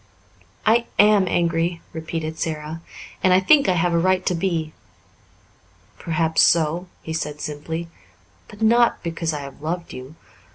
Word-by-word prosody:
"I 230 Hz, +2 st, +3 dB
am 205 Hz, -2 st, +5 dB
angry," 170 Hz, 0 st, 0 dB
repeated 160 Hz, 0 st, -5 dB
Sara, 155 Hz, 0 st, -4 dB, 0.4 s
"and 185 Hz, -, +4 dB
I 185 Hz, -, +6 dB
think 275 Hz, +6 st, +4 dB
I -, -, +4 dB
have 175 Hz, 0 st, +1 dB
a 170 Hz, -, +3 dB
right 185 Hz, +1 st, +1 dB
to -, -, +1 dB
be." 165 Hz, -3 st, -2 dB, 1.3 s
"Perhaps 160 Hz, -1 st, +1 dB
so," 170 Hz, +2 st, +3 dB, 0.2 s
he 160 Hz, -, -5 dB
said 150 Hz, -2 st, -4 dB
simply, 160 Hz, +3 st, -5 dB, 0.6 s
"but 210 Hz, +1 st, -8 dB
not 235 Hz, +2 st, +3 dB
because 165 Hz, -1 st, -2 dB
I 150 Hz, -2 st, -4 dB
have 140 Hz, 0 st, -10 dB
loved 170 Hz, +3 st, -4 dB
you. 130 Hz, +4 st, -9 dB
165 Hz, 150 wpm, -22 LUFS, 160-185 Hz, 1.3 s, I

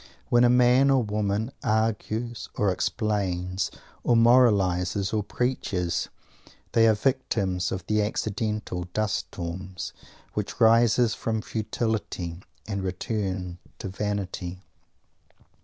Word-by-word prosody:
When 120 Hz, 0 st, +5 dB
a 120 Hz, -, +6 dB
man 125 Hz, +2 st, +5 dB
or 135 Hz, -2 st, +4 dB
woman 105 Hz, +2 st, -1 dB
"argues" 110 Hz, +1 st, -1 dB
or 105 Hz, -2 st, +2 dB
"explains" 95 Hz, -3 st, -1 dB, 0.3 s
or 120 Hz, -, +3 dB
"moralizes" 100 Hz, -6 st, +4 dB
or 110 Hz, -, +2 dB
"preaches," 100 Hz, -6 st, -1 dB, 0.6 s
they 115 Hz, -1 st, +5 dB
are 110 Hz, -, +5 dB
the 105 Hz, -, -13 dB
victims 100 Hz, -9 st, 0 dB
of 95 Hz, -1 st, -3 dB
accidental 105 Hz, -3 st, -1 dB
dust 110 Hz, -2 st, +1 dB
storms, 90 Hz, +2 st, -6 dB, 0.4 s
which 105 Hz, +3 st, -4 dB
rise 115 Hz, 0 st, +5 dB
from 110 Hz, -1 st, -2 dB
futility 110 Hz, -6 st, -3 dB, 0.3 s
and 100 Hz, -2 st, -2 dB
return 95 Hz, -1 st, -3 dB, 0.2 s
to 95 Hz, -, -5 dB
vanity. 95 Hz, -2 st, -4 dB
105 Hz, 105 wpm, -26 LUFS, 95-115 Hz, 0.6 s, a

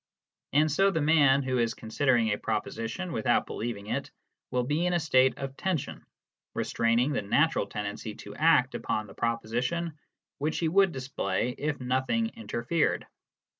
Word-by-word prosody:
And 155 Hz, +2 st, +3 dB
so 195 Hz, +6 st, +4 dB
the 185 Hz, -, 0 dB
man 145 Hz, -3 st, +4 dB
who 130 Hz, -1 st, 0 dB
is 115 Hz, 0 st, +1 dB
considering 115 Hz, 0 st, +1 dB
a 105 Hz, -, 0 dB
proposition 140 Hz, +11 st, -3 dB
without 110 Hz, -, +1 dB
believing 110 Hz, -3 st, -5 dB
it 105 Hz, -, -3 dB, 0.4 s
will 125 Hz, -1 st, 0 dB
be 150 Hz, +7 st, 0 dB
in 180 Hz, -, +1 dB
a 175 Hz, -, +3 dB
state 130 Hz, -5 st, +3 dB
of 135 Hz, -1 st, -5 dB
tension, 180 Hz, -4 st, -3 dB, 0.5 s
restraining 115 Hz, +4 st, +1 dB
the 130 Hz, -, 0 dB
natural 145 Hz, +3 st, +2 dB
tendency 105 Hz, +1 st, -5 dB
to 100 Hz, -, -10 dB
act 140 Hz, -3 st, +4 dB
upon 110 Hz, -, -2 dB
the 100 Hz, -, -13 dB
proposition 120 Hz, +8 st, -2 dB, 0.4 s
which 155 Hz, +2 st, -1 dB
he 165 Hz, -, +1 dB
would 195 Hz, +2 st, +4 dB
display 125 Hz, -, -2 dB
if 145 Hz, +4 st, -3 dB
nothing 130 Hz, -, 0 dB
interfered. 165 Hz, -, -1 dB
130 Hz, 155 wpm, -28 LUFS, 115-160 Hz, 0.5 s, so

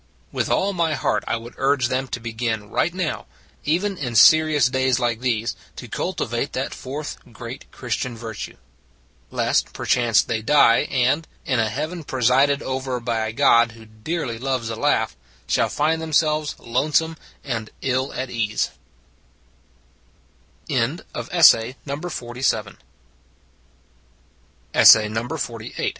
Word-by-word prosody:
With -, -, -2 dB
all 200 Hz, +1 st, +1 dB
my 165 Hz, -4 st, 0 dB
heart -, -, 0 dB
I 115 Hz, -, 0 dB
would 115 Hz, +1 st, -10 dB
urge 135 Hz, -2 st, +2 dB
them 130 Hz, +1 st, -1 dB
to 125 Hz, -, -4 dB
begin 115 Hz, -2 st, -3 dB
right 175 Hz, -, +1 dB
now 180 Hz, -3 st, -3 dB, 0.4 s
even 185 Hz, +5 st, 0 dB
in 125 Hz, -5 st, -4 dB
serious 155 Hz, +3 st, +6 dB
days 130 Hz, -1 st, +1 dB
like 120 Hz, -2 st, 0 dB
these 115 Hz, -3 st, -1 dB, 0.2 s
to -, -, -8 dB
cultivate -, -, -3 dB
that -, -, -3 dB
fourth 145 Hz, +4 st, -6 dB
great 120 Hz, +2 st, -9 dB
Christian 120 Hz, 0 st, -4 dB
virtue. 115 Hz, -2 st, -7 dB, 0.7 s
Lest -, -, 0 dB
perchance 120 Hz, -4 st, +2 dB
they 115 Hz, -1 st, -2 dB
die, 120 Hz, +1 st, +4 dB
and 135 Hz, +5 st, +1 dB, 0.2 s
in 130 Hz, -3 st, +1 dB
a 110 Hz, -1 st, +1 dB
heaven 155 Hz, -, -4 dB
presided 135 Hz, +2 st, +2 dB
over 130 Hz, -1 st, -3 dB
by 115 Hz, -2 st, -1 dB
a -, -, -3 dB
God 115 Hz, -2 st, +4 dB
who 110 Hz, 0 st, -14 dB
dearly 115 Hz, +3 st, -4 dB
loves 130 Hz, -3 st, -2 dB
a -, -, -3 dB
laugh 115 Hz, -3 st, +1 dB, 0.3 s
shall -, -, +1 dB
find 160 Hz, +2 st, 0 dB
themselves 155 Hz, -1 st, +1 dB
lone 125 Hz, +6 st, -2 dB
some 160 Hz, +1 st, +2 dB, 0.3 s
and 115 Hz, -5 st, -4 dB
ill 130 Hz, +1 st, 0 dB
at 130 Hz, -1 st, -4 dB
ease. 105 Hz, -2 st, -1 dB
130 Hz, 120 wpm, -22 LUFS, 115-150 Hz, 0.7 s, serious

